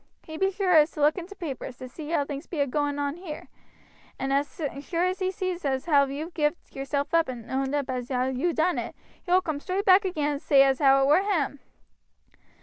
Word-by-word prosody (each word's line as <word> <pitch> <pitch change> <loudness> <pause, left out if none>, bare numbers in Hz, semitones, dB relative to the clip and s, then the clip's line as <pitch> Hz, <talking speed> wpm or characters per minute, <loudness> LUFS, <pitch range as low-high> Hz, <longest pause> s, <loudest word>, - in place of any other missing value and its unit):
He 315 - -9
be 385 +4 +1
sure 365 -5 +4
to 300 0 -9
look 295 +1 +4
in 345 - -8
t' 405 - -11
papers, 270 -7 -6
to 255 - -8
see 295 +4 -9
how 305 -4 +1
things 285 +2 -6
be 325 - -5
a 285 - +3
going 290 +1 -1
on 285 +2 -2
here; 350 -4 -8 0.7
and 270 +1 -2
as 285 +5 -1 0.2
sure 335 +4 -1
as 365 +1 -1
he 375 -1 0
sees 370 -2 -3
as 265 -2 -1
how 285 -4 +4
you've 305 +5 -6
gived 300 +1 -2
yourself 280 +3 -2
up 330 -4 +3
and 235 -2 -7
owed 265 0 -1
up 285 -2 -1
as 250 -2 -4
you 260 +4 0
ha' - - -7
done 340 +3 +1
it, - - -6 0.3
he - - -13
will 370 +1 +5
coom 310 -3 -3
straight 375 +6 -2
back 380 +2 +6
again 305 -6 -1
and 285 0 -4
say 275 -2 +5
as 270 -1 +2
how 275 -1 +5
it - - +3
were 300 +6 +5
him." 330 -9 -1
295 Hz, 240 wpm, -26 LUFS, 275-350 Hz, 0.7 s, back